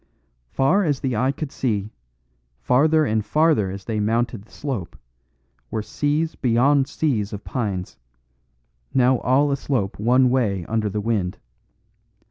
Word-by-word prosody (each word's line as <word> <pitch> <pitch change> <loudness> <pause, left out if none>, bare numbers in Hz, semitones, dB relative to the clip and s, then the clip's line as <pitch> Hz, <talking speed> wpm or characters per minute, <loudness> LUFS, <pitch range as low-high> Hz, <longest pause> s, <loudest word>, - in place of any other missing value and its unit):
Far 160 - +2
as 145 -6 0
the 130 -3 -1
eye 130 +5 +2
could 140 0 -6
see, 110 -7 -2 0.7
farther 155 - +3
and 110 -4 0
farther 150 -5 +2
as 95 0 -7
they 110 -2 -2
mounted 115 +1 0
the - - -26
slope, 130 - -5 0.7
were 110 -1 -3
seas 145 +8 -1
beyond 130 +3 +2
seas 115 -10 -1
of 105 - -6
pines, 100 - -4 1.0
now 130 -1 +4
all 140 +3 +2
aslope 130 -9 -2
one 125 +3 +4
way 100 -9 0
under 110 -1 -1
the 105 +1 -3
wind. 100 -5 -1
120 Hz, 135 wpm, -22 LUFS, 105-140 Hz, 1.0 s, now